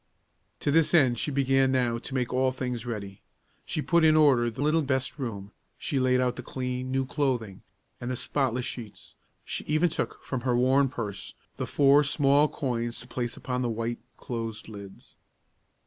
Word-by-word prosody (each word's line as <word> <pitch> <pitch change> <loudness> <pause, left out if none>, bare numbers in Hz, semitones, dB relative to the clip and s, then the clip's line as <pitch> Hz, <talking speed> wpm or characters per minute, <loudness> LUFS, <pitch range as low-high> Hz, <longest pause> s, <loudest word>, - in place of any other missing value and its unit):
To 145 - +1
this 160 +2 +4
end 130 -7 +4
she - - -1
began 135 -1 +2
now 120 -3 +1
to 135 - -6
make 125 -1 -1
all 130 +1 +2
things 125 -2 -4
ready. 100 -4 -6 0.5
She 155 - -2
put 170 -2 +3
in 155 -1 +6
order 135 -6 +5
the 120 +5 -4
little 155 +2 +3
best 135 0 -1
room; 105 -6 -5 0.3
she 140 - -1
laid 130 0 +3
out 125 -1 0
the - - -4
clean, 125 0 -4
new 135 0 +1
clothing, 125 -8 -2 0.4
and 120 - -5
the 130 - -1
spotless 125 -1 -1
sheets; 110 -5 -8 0.3
she - - -3
even 155 +3 +2
took 165 - -4
from 130 -2 -3
her 125 -1 +1
worn 130 +2 +4
purse 105 -6 -6 0.2
the - - -3
four 140 +1 +5
small 145 +1 +3
coins 120 -5 -3
to 125 - -10
place 120 -1 -4
upon 125 -1 -3
the 120 - 0
white, 115 +1 -3 0.2
closed 115 -3 -5
lids. 100 -3 -11
125 Hz, 180 wpm, -27 LUFS, 120-140 Hz, 0.5 s, in